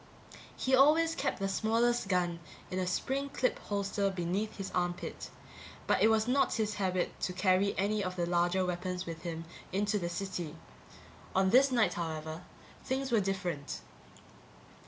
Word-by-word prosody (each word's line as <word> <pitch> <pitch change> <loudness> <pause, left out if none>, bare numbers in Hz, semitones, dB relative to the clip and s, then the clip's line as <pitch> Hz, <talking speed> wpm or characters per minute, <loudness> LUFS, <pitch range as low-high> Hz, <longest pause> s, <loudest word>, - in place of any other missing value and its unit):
He 260 - -1
always 310 +5 +6
kept - - -1
the 195 - -1
smallest 230 +3 +1
gun 175 -3 +1 0.3
in 185 - -1
a 185 - -1
spring 270 +9 -1
clip 255 -2 0
holster 200 0 -1
beneath 190 +4 -2
his 195 -2 -5
armpit, 175 -1 -2 0.6
but - - +2
it - - +7
was 220 0 +3
not 270 +3 +2
his 215 -2 0
habit 185 -2 -1
to 180 - -2
carry 185 +1 +2
any 205 +2 +1
of 185 -1 -3
the 175 -1 0
larger 175 +2 +2
weapons 180 +1 -3
with 165 -1 -6
him 165 -1 -5 0.3
into 205 +2 +1
the 170 -2 -2
city. 175 -3 -4 0.8
On 190 0 +3
this 265 +3 +6
night, 235 -3 +3
however, 160 -1 -4 0.4
things 265 0 -2
were 230 - +5
different. 180 -7 -3
190 Hz, 155 wpm, -32 LUFS, 175-220 Hz, 0.8 s, it